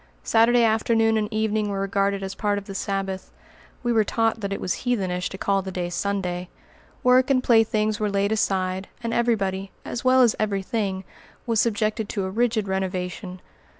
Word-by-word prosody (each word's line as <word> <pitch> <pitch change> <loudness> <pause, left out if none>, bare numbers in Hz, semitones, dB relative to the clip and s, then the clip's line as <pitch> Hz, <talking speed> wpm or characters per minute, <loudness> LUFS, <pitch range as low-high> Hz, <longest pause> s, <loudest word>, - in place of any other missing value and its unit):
Saturday 235 +1 +4
afternoon 225 0 +3
and 215 0 -1
evening 215 -1 0
were 200 -1 -2
regarded 195 0 0
as 190 0 -4
part 205 -1 0
of 200 - -5
the 195 - -7
Sabbath 195 -1 -3 0.5
(we 240 -1 +1
were 220 -1 +4
taught 225 +1 0
that 200 -1 -3
it 200 - -2
was 180 - -2
heathenish 190 -8 -1
to 190 - -7
call 195 0 +1
the 190 0 -6
day 175 -1 -3
Sunday); 180 -1 -2 0.5
work 255 +1 +5
and 255 -2 +3
playthings 215 -2 +3
were 210 -1 0
laid 200 +1 0
aside, 190 -3 0 0.2
and 230 0 -2
every 235 0 +3
body, 195 -1 -3
as 240 - -4
well 255 0 +5
as 235 - +3
every 200 -2 0
thing, 195 -3 -2 0.4
was 230 -2 +2
subjected 215 -1 0
to 200 - -2
a 190 - -4
rigid 225 -1 +1
renovation. 185 -1 -3
205 Hz, 185 wpm, -24 LUFS, 190-225 Hz, 0.5 s, work